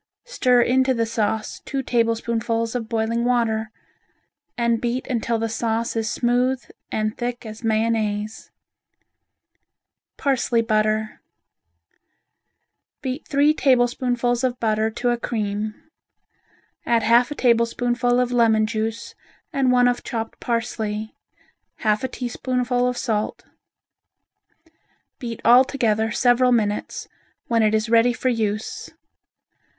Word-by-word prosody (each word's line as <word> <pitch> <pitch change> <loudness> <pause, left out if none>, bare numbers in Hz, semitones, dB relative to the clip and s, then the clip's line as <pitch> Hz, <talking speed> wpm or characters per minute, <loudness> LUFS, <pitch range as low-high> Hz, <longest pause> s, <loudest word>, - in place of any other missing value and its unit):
Stir 250 - +3
into 260 +1 +2
the 230 -1 +1
sauce 220 -1 -2
two 270 -1 -3
tablespoonfuls 230 -1 0
of 230 -3 -4
boiling 230 +1 0
water, 230 -3 +1 0.9
and 235 -1 +1
beat 245 +2 -2
until 235 -3 -1
the 225 0 -1
sauce 230 +1 -2
is 220 -1 -1
smooth 245 +2 +1 0.3
and 215 0 -1
thick 240 0 -4
as 220 +1 -9
mayonnaise. 220 -1 -1 1.7
Parsley 255 -4 +1
Butter 215 -1 0 1.8
Beat 260 +3 -4
three 290 +2 +3
tablespoonfuls 245 -2 +1
of 255 -1 -1
butter 220 -1 +1
to 240 +2 -1
a 240 - 0
cream. 210 -2 -3 1.1
Add 230 -2 +1
half 235 +3 +4
a 295 - -5
tablespoonful 245 0 +2
of 250 -1 0
lemon 225 -3 +3
juice 225 +1 -3 0.4
and 270 -3 +2
one 245 0 +4
of 245 0 0
chopped 225 -1 -5
parsley, 220 -2 -3 0.6
half 215 0 0
a - - +1
teaspoonful 250 0 -1
of 250 -1 -2
salt. 215 -4 -2 1.7
Beat 235 -3 -5
all 245 +2 +8
together 225 -5 0
several 245 +2 +3
minutes, 210 -3 -1 0.4
when 230 -1 +1
it 215 0 +3
is 215 +1 0
ready 230 +2 +4
for 255 +1 -1
use. 215 -2 -2
235 Hz, 115 wpm, -22 LUFS, 220-245 Hz, 1.8 s, all